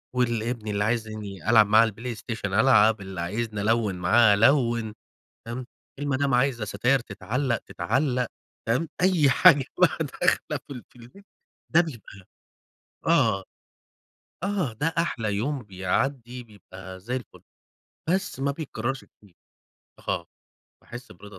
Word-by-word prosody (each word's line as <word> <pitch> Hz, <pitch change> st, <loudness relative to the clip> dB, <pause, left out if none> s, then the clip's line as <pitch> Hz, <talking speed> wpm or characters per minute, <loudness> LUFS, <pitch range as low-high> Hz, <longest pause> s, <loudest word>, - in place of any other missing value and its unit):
واللي 120 Hz, -2 st, 0 dB
ابني 110 Hz, -4 st, -4 dB
اللي 100 Hz, 0 st, 0 dB
عايزني 110 Hz, -4 st, -3 dB
ألعب 110 Hz, -2 st, +6 dB
معاه 110 Hz, +2 st, +6 dB
على 115 Hz, -, +3 dB
البلايستيشن، 110 Hz, -2 st, -5 dB
ألعب، 110 Hz, -2 st, +5 dB
اللي 95 Hz, -2 st, -6 dB
عايزني 105 Hz, +3 st, -3 dB
ألوِّن 110 Hz, -2 st, +1 dB
معاه، 105 Hz, +5 st, +5 dB
ألوِّن. 115 Hz, -1 st, +3 dB, 0.5 s
فاهم، 120 Hz, +2 st, -5 dB, 0.3 s
المدام 140 Hz, -1 st, 0 dB
عايزة 125 Hz, -3 st, +1 dB
ستاير 120 Hz, +6 st, +1 dB
تتعلق، 120 Hz, +3 st, -2 dB
تتعلق، 125 Hz, -, -1 dB, 0.4 s
فاهم، 125 Hz, +9 st, 0 dB
أي 180 Hz, -6 st, +4 dB
حاجة 145 Hz, 0 st, +6 dB
بقى -, -, +3 dB
داخلة -, -, -1 dB
في -, -, -7 dB
ال 125 Hz, -, -8 dB
في -, -, -24 dB
البيت 125 Hz, +13 st, -16 dB, 0.5 s
ده 170 Hz, -, +8 dB
بيبقي 115 Hz, -, -6 dB, 0.8 s
آه، 95 Hz, 0 st, +3 dB, 1.0 s
آه، 190 Hz, -, -1 dB
ده 145 Hz, +8 st, -2 dB
أحلي 115 Hz, -11 st, -1 dB
يوم 130 Hz, +5 st, -2 dB
بيعدي، 120 Hz, +6 st, -2 dB
بيبقي 95 Hz, -4 st, -12 dB
زي 120 Hz, +7 st, -4 dB
الفل، 125 Hz, -5 st, -8 dB, 0.7 s
بس 190 Hz, -5 st, -1 dB
ما 140 Hz, +1 st, +1 dB
بيتكررش 135 Hz, -4 st, -4 dB
كتير. 100 Hz, -4 st, -24 dB, 0.7 s
آه، -, -, -1 dB, 0.6 s
باحس 120 Hz, -2 st, -10 dB
برضا 105 Hz, 0 st, -13 dB
115 Hz, 130 wpm, -25 LUFS, 105-135 Hz, 1.0 s, ده